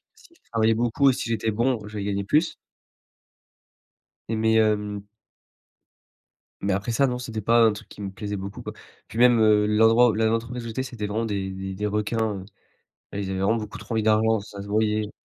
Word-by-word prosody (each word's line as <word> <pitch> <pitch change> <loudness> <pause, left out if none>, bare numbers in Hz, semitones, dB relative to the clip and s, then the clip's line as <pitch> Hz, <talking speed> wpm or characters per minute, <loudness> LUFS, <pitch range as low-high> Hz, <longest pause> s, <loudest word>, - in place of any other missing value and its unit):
si - - -20
je - - -30
travaillais 115 -1 +3
beaucoup, 120 +4 +3
si 125 - -4
j'étais 110 -1 0
bon, 120 +3 +1
je 105 0 -8
vais 100 - -3
gagner 100 -1 -1
plus. 150 - +1 1.7
Et 115 - -1
mais 110 0 +2
hem 105 -2 0 1.6
mais 100 0 0
après 100 +5 -2
ça 140 +5 +3
non, 125 -1 -2
c'était 115 -4 -5
pas 115 +3 +3
un 110 -2 +5
truc 105 - -10
qui - - -11
me 100 - -4
plaisait 105 +1 -5
beaucoup 100 +1 -7
quoi. - - -7 0.3
Puis 110 - -9
même 120 -1 +6
heu, 105 -1 +4
l'endroit, 115 +2 +5
là 110 0 +2
où - - +2
l'entreprise 115 +1 -3
où - - -6
j'étais, 125 +3 -3
c'était 120 -5 -5
vraiment 110 +3 -2
des 100 -3 -3
des 95 0 -5
des 105 +2 -3
requins, 105 0 -1
heu. - - -11 0.7
Ah, - - -4
Ils 100 -1 -3
avaient 95 - -2
vraiment 105 +4 +2
beaucoup 105 -1 -7
trop - - -8
envie 110 - +1
d'argent, 110 0 +3
ça 100 0 -10
se 100 - -10
voyait. 105 0 0
110 Hz, 210 wpm, -24 LUFS, 105-115 Hz, 1.7 s, même